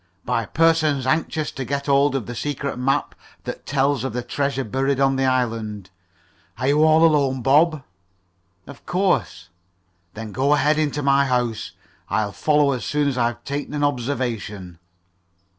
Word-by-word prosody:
"By 115 Hz, -2 st, -1 dB
persons 155 Hz, -4 st, +2 dB
anxious 155 Hz, +2 st, -1 dB
to 135 Hz, -, -5 dB
get 140 Hz, +2 st, -3 dB
hold 140 Hz, 0 st, +3 dB
of 130 Hz, -6 st, -2 dB
the 120 Hz, -, -6 dB
secret 140 Hz, 0 st, -4 dB
map 135 Hz, +3 st, 0 dB, 0.3 s
that -, -, -7 dB
tells 140 Hz, -2 st, +1 dB
of 130 Hz, -4 st, -3 dB
the 125 Hz, 0 st, -3 dB
treasure 140 Hz, +2 st, -2 dB
buried 135 Hz, +4 st, -1 dB
on 135 Hz, 0 st, +3 dB
the 135 Hz, 0 st, +1 dB
island. 110 Hz, -6 st, -2 dB, 0.7 s
Are 130 Hz, +3 st, 0 dB
you 150 Hz, +2 st, +4 dB
all 160 Hz, +1 st, +5 dB
alone, 140 Hz, -5 st, +2 dB
Bob?" 150 Hz, +2 st, +3 dB, 0.8 s
"Of 140 Hz, -, -13 dB
course." 180 Hz, -, 0 dB, 0.7 s
"Then 110 Hz, 0 st, -7 dB
go 140 Hz, +6 st, +2 dB
ahead 150 Hz, +2 st, +2 dB
into 145 Hz, -1 st, -1 dB
my 140 Hz, 0 st, +3 dB
house. 120 Hz, -3 st, -1 dB, 0.4 s
I'll 105 Hz, -2 st, 0 dB
follow 150 Hz, +4 st, +2 dB
as 130 Hz, -3 st, -3 dB
soon 150 Hz, -1 st, 0 dB
as 135 Hz, -, -3 dB
I've 120 Hz, 0 st, -1 dB
taken 145 Hz, +1 st, -4 dB
an 145 Hz, -, -1 dB
observation." 120 Hz, -, -3 dB
135 Hz, 160 wpm, -22 LUFS, 120-145 Hz, 0.8 s, all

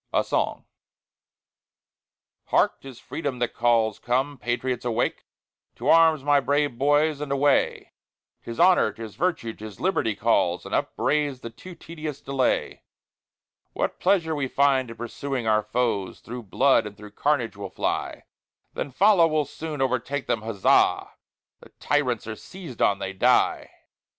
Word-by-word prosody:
A -, -, +2 dB
SONG -, -, -2 dB, 1.8 s
Hark! -, -, +1 dB
'tis 135 Hz, -3 st, -11 dB
Freedom 140 Hz, -5 st, -4 dB
that 120 Hz, -1 st, -2 dB
calls, 115 Hz, -3 st, +2 dB
come, 130 Hz, +3 st, -1 dB
patriots, 120 Hz, +1 st, -2 dB
awake! 120 Hz, -1 st, -1 dB, 0.5 s
To -, -, -3 dB
arms, 160 Hz, -3 st, +5 dB
my 145 Hz, 0 st, +4 dB
brave 145 Hz, -1 st, 0 dB
boys, 145 Hz, +1 st, +2 dB
and 150 Hz, -2 st, -4 dB
away: 140 Hz, 0 st, +1 dB, 0.5 s
'Tis 115 Hz, -, -7 dB
Honor, 175 Hz, -10 st, +5 dB
'tis 110 Hz, 0 st, -9 dB
Virtue, 165 Hz, -11 st, -1 dB
'tis 110 Hz, -2 st, -10 dB
Liberty 175 Hz, -, 0 dB
calls, 95 Hz, -5 st, +1 dB
And -, -, -7 dB
upbraids 145 Hz, -3 st, 0 dB
the 115 Hz, -, -7 dB
too 180 Hz, +8 st, -12 dB
tedious 155 Hz, -3 st, -7 dB
delay. 135 Hz, -2 st, -1 dB, 0.9 s
What -, -, -2 dB
pleasure 165 Hz, -5 st, +2 dB
we 145 Hz, -3 st, -1 dB
find 135 Hz, -2 st, +2 dB
in 115 Hz, -, -9 dB
pursuing 125 Hz, +1 st, -4 dB
our 110 Hz, -1 st, +3 dB
foes, 105 Hz, -3 st, -2 dB
Thro' 120 Hz, +2 st, -7 dB
blood 115 Hz, +2 st, +2 dB
and 105 Hz, -1 st, -11 dB
thro' 105 Hz, -1 st, -12 dB
carnage 120 Hz, -3 st, 0 dB
we'll 100 Hz, -, -7 dB
fly; -, -, -3 dB, 0.5 s
Then -, -, -4 dB
follow, 180 Hz, +4 st, +4 dB
we'll 155 Hz, -2 st, 0 dB
soon 150 Hz, 0 st, -4 dB
overtake 130 Hz, +2 st, -2 dB
them, 115 Hz, -, -1 dB
huzza! 110 Hz, -3 st, +2 dB, 0.5 s
The -, -, -16 dB
tyrants 130 Hz, -6 st, 0 dB
are 110 Hz, 0 st, -5 dB
seized 175 Hz, -, -10 dB
on, 100 Hz, -, +3 dB
they 95 Hz, 0 st, -5 dB
die! 95 Hz, -, +2 dB
130 Hz, 145 wpm, -25 LUFS, 115-145 Hz, 1.8 s, arms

